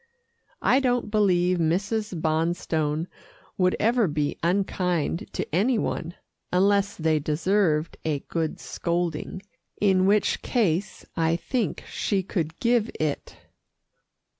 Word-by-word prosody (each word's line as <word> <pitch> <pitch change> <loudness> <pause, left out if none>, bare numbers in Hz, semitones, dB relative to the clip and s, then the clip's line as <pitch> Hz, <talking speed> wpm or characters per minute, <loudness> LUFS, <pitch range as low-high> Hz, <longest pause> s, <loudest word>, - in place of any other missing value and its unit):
I 260 - +5
don't 245 -5 0
believe 180 -4 +3
Mrs. 195 +4 0
Bonstone 160 -1 0 0.5
would 185 -1 +2
ever 230 -1 +3
be 150 -2 -1
unkind 180 0 0
to - - -2
any 225 +8 +3
one, 175 -4 -3 0.4
unless 200 +2 +3
they 160 -1 +1
deserved 160 +1 +1
a 150 -3 -1
good 165 -2 -3
scolding, 170 +2 -3 0.4
in 190 -2 +3
which 205 +1 +2
case 195 -5 0
I 165 -1 +2
think 230 +5 -2
she 195 -3 -1
could 165 -3 -3
give 235 -2 +2
it. 155 -2 -3
180 Hz, 115 wpm, -25 LUFS, 160-205 Hz, 0.5 s, I